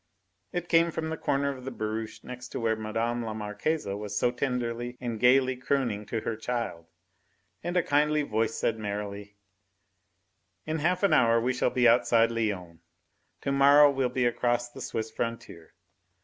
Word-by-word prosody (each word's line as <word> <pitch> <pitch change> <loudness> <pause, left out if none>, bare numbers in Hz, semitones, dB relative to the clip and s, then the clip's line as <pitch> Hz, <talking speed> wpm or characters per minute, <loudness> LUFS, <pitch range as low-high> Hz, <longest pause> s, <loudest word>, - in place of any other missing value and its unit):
It 175 0 -3
came 165 0 +4
from 160 -1 -3
the - - -1
corner 140 -2 0
of 130 - -11
the 135 - -4
barouche 110 -2 -5
next 125 0 -8
to - - -3
where 115 -1 +1
Mme. 115 +2 -2
la 110 -1 -4
Marquise 110 +9 -2
was 105 +1 -4
so 120 - +2
tenderly 120 -1 -3
and 120 -3 -4
gaily 130 +2 +4
crooning 125 -5 -1
to 115 0 -2
her 110 - -3
child. 110 -7 -4 0.8
And 175 +1 -1
a 175 - +3
kindly 150 +1 +2
voice 110 -4 -1
said 115 -1 -1
merrily: 100 -1 -5 1.3
"In 155 +1 -2
half 180 +5 0
an 200 - +4
hour 115 -1 +5
we 125 +3 0
shall 125 - +1
be 125 -1 +3
outside 115 -1 +4
Lyons. 100 -7 -3 0.6
To 140 - -1
morrow 140 +1 +7
we'll 135 -2 0
be 125 0 0
across 120 0 0
the 135 - -10
Swiss 110 -2 -4
frontier. 115 -9 -6
120 Hz, 170 wpm, -28 LUFS, 110-135 Hz, 1.3 s, morrow